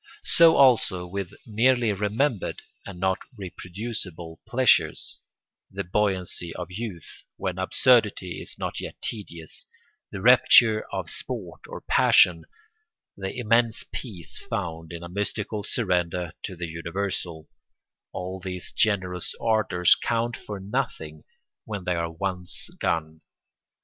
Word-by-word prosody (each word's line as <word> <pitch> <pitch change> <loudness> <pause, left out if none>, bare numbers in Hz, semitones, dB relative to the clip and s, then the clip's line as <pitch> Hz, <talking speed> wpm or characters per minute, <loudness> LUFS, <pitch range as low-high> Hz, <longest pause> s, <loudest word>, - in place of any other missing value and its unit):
So 165 -1 +6
also 115 -9 +4
with 95 0 -4
merely 115 0 +3
remembered 105 +3 -1 0.2
and 95 -3 -8
not 95 0 +1 0.2
reproducible 90 -3 -6
pleasures; 130 +1 +3 0.5
the 100 +1 -4
buoyancy 90 -3 -1
of 90 0 -6
youth, 95 -4 -7
when 95 -1 -3
absurdity 100 -4 +3
is - - -4
not - - -3
yet - - -7
tedious, 85 -7 -5 0.4
the 100 - -5
rapture 115 -1 +6
of - - -3
sport - - -6
or - - -8
passion, 85 -3 +5 0.7
the 95 0 -4
immense 115 -1 +2
peace 100 -10 -5
found 80 -1 -4
in 85 0 -7
a - - -6
mystical 105 +3 -3
surrender 90 -6 0
to 95 - -6
the 85 0 -4
universal, 85 -1 -4 0.6
all 95 +1 -5
these 90 -1 -4
generous 95 -5 0
ardours 110 -6 +4
count 115 0 -1
for 105 -2 -7
nothing 95 - -4 0.4
when 105 -3 -5
they 90 0 0
are 85 -1 -2
once 90 +1 -2
gone. 80 -1 -1
95 Hz, 120 wpm, -26 LUFS, 85-110 Hz, 0.7 s, So